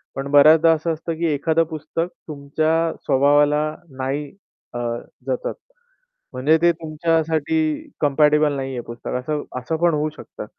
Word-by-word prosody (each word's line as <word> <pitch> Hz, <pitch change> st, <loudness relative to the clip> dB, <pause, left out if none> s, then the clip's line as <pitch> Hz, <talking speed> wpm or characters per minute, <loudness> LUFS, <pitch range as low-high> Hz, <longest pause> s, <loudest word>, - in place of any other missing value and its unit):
पण 135 Hz, +1 st, -4 dB
बऱ्याचदा 155 Hz, +3 st, +7 dB
असं 160 Hz, +1 st, -1 dB
असतं 165 Hz, +1 st, -4 dB
की 170 Hz, -, -1 dB
एखादं 160 Hz, +3 st, +1 dB
पुस्तक 160 Hz, +1 st, -4 dB, 0.2 s
तुमच्या 155 Hz, +3 st, 0 dB
स्वभावाला 145 Hz, +2 st, +3 dB, 0.3 s
नाही 140 Hz, +2 st, -3 dB, 0.4 s
अ, 120 Hz, -, -4 dB, 0.5 s
जतत. 130 Hz, -2 st, -2 dB, 0.8 s
म्हणजे 140 Hz, +5 st, +3 dB
ते 170 Hz, -, +5 dB
तुमच्यासाठी 160 Hz, -, -1 dB, 0.4 s
कंपॅटिबल 150 Hz, +1 st, +3 dB
नाहीये 135 Hz, -2 st, -4 dB
पुस्तक. 120 Hz, 0 st, -8 dB
असं 150 Hz, +3 st, -3 dB, 0.2 s
असं 125 Hz, +6 st, -3 dB
पण 170 Hz, -1 st, +3 dB
होऊ 150 Hz, +1 st, 0 dB
शकतं. -, -, -9 dB
150 Hz, 130 wpm, -21 LUFS, 140-160 Hz, 0.8 s, बऱ्याचदा